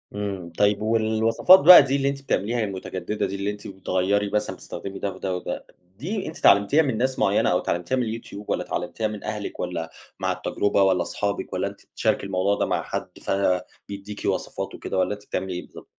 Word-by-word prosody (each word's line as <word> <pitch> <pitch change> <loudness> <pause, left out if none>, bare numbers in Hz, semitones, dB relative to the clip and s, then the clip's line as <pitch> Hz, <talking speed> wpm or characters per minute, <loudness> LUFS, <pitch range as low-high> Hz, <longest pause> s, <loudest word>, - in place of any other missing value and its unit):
إمم، 100 -4 -4
طيب 105 0 +3
والوصفات 110 - +4
بقى 175 +1 +10
دي 135 0 0
اللي 140 0 +1
أنتِ 140 0 -4
بتعمليها 120 -2 0
المتجددة 95 0 -3
دي 95 +1 -4
اللي 100 +1 -2
أنتِ 105 +1 -9
بتغيّري 95 +1 0
مثلًا 105 +1 -1
بتستخدمي 100 0 -8
ده 100 - -2
وده 95 -1 -3
وده، 90 - -5 0.3
دي 190 - -3
أنتِ 160 - -7
اتعلمتيها 100 +10 +5
من 130 -6 -1
ناس 130 +2 0
معيّنة - - +3
أو - - +3
اتعلمتيها 90 +9 -1
من 125 - +1 0.2
الYouTube 105 -2 -10
والّا - - -1
اتعلمتيها 110 - -3
من 105 -1 -7
أهلِك 105 -1 -5
والّا 85 -2 -3 0.3
مع - - 0
التجربة 100 -1 0
والّا 95 -2 +3
صحابك 100 +4 -3
والّا - - -1
أنتِ - - -10
بتشاركي - - -1
الموضوع 95 +1 +1
ده - - 0
مع - - -1
حد، - - -4
فبيديكِ 100 +2 -3
وصفات - - -2
وكده - - -4
والّا 95 +2 +1
أنتِ 105 0 -11
بتعملي 95 -1 -3
إيه 90 - -4
بالضبط؟ - - -13
100 Hz, 195 wpm, -24 LUFS, 95-110 Hz, 0.3 s, بقى